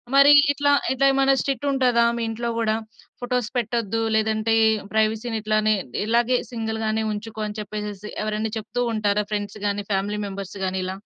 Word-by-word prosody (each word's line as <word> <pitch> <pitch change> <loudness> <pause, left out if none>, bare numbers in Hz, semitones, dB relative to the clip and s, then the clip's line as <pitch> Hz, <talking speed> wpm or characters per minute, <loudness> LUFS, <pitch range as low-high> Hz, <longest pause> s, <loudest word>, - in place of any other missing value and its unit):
మరి 280 +1 +8 0.2
ఇట్లా, 285 0 +2 0.2
ఇట్లా 270 +1 +1
ఏమైనా 270 0 +4
స్ట్రిక్ట్ 280 +1 -2
ఉంటదా? 250 -3 +3
మీ 235 - -2
ఇంట్లో 235 +1 -3
కూడా 220 -1 +1 0.5
ఫోటోస్ 245 -2 -1
పెట్టొద్దు, 225 -2 -1
లేదంటే 220 0 +1 0.4
ప్రైవసీని 220 +1 0
ఇట్లానే 215 0 +2 0.3
ఇలాగే 235 +3 +2
సింగిల్ 220 -2 -3
గానే 220 0 0
ఉంచుకో 215 +1 -6
అని 210 +1 -7
చెప్పేసి 210 0 -6
ఎవరైనా 215 +1 -2
చెప్తూ 225 +3 -4
ఉంటారా 210 -1 +1
ఫ్రెండ్స్ 205 0 -3
గాని, 205 0 -1
ఫ్యామిలీ 200 +2 -1
మెంబర్స్ 195 0 -7
గాని 190 0 -2
ఇలా? 190 +1 -4
220 Hz, 155 wpm, -23 LUFS, 210-235 Hz, 0.5 s, మరి